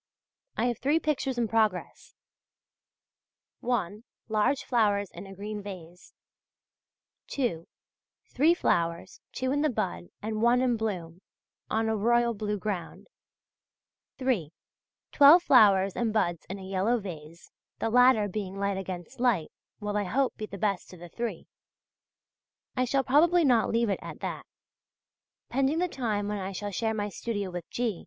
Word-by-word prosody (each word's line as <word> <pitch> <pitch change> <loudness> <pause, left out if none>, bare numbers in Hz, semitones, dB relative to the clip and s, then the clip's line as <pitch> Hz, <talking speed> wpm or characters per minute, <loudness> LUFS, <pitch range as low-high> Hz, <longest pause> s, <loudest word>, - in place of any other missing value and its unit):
I - - +1
have 240 -2 -1
three 290 +6 +2
pictures 270 -5 -1
in 235 -1 +1
progress: 215 -4 -1 1.4
(1) 215 -4 -2 0.3
Large 220 +6 +1
flowers 205 -5 +1
in 200 - -10
a 195 - -10
green 210 +2 -5
vase; 180 -3 -11 1.1
(2) 225 - -2 0.7
Three 320 +6 +4
flowers, 170 - -1
two 260 0 -2
in 290 +1 +1
the 305 - +2
bud 190 -8 -2
and 215 0 -3
one 240 +2 +4
in 245 -2 +2
bloom, 185 -6 -4 0.5
on 220 0 0
a 220 - +1
royal 235 +2 +2
blue 210 -1 -2
ground; 195 - -5 1.1
(3) 235 - 0 0.6
Twelve 300 +5 +8
flowers 200 - +5
and 235 -2 0
buds 175 -6 -1
in 195 - -4
a 195 - -10
yellow 195 +5 0
vase 170 -4 -10 0.3
(the 225 - -2
latter 245 -3 +5
being 195 -1 -5
light 200 -1 -1
against 180 -1 -7
light), 235 -11 +1 0.3
will 210 -1 -3
I 205 -1 0
hope 255 +7 0
be 215 - -6
the 200 - -8
best 200 -1 -1
of 180 - -12
the 175 0 -10
three. 235 +6 -4 1.3
I 255 -1 +1
shall 270 +2 +1
probably 325 +6 +4
not 245 -4 +3
leave 230 -1 +1
it - - -1
at - - -8
that. - - -5 1.0
Pending 275 +4 +1
the 360 +2 +1
time 220 - -2
when 210 0 -2
I 190 +1 -4
shall 205 +2 -4
share 220 +3 -1
my 205 -1 -2
studio 205 -1 -4
with 175 -1 -7
G. 230 -7 -2
215 Hz, 155 wpm, -28 LUFS, 195-245 Hz, 1.4 s, Twelve